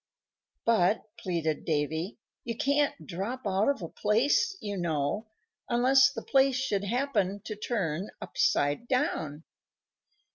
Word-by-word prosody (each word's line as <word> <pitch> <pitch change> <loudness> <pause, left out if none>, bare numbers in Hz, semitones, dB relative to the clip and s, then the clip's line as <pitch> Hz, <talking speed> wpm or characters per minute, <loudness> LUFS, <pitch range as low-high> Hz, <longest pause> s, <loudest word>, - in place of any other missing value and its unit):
"But," 215 -3 +3 0.2
pleaded 165 -5 -1
Davy, 160 +4 -1 0.3
"you 230 -1 -4
can't 285 +1 +1
drop 210 +9 -4
out 195 +4 +2
of 275 -9 -1
a - - -3
place, 260 - +2
you 205 -1 -4
know, 170 +3 -1 0.4
unless 260 +3 +5
the - - -6
place 270 -1 +3
should 205 -6 -1
happen 210 -4 0
to 215 - -6
turn 200 -5 -2
upside 145 +12 +1
down." 160 - -1
210 Hz, 120 wpm, -29 LUFS, 170-255 Hz, 0.4 s, unless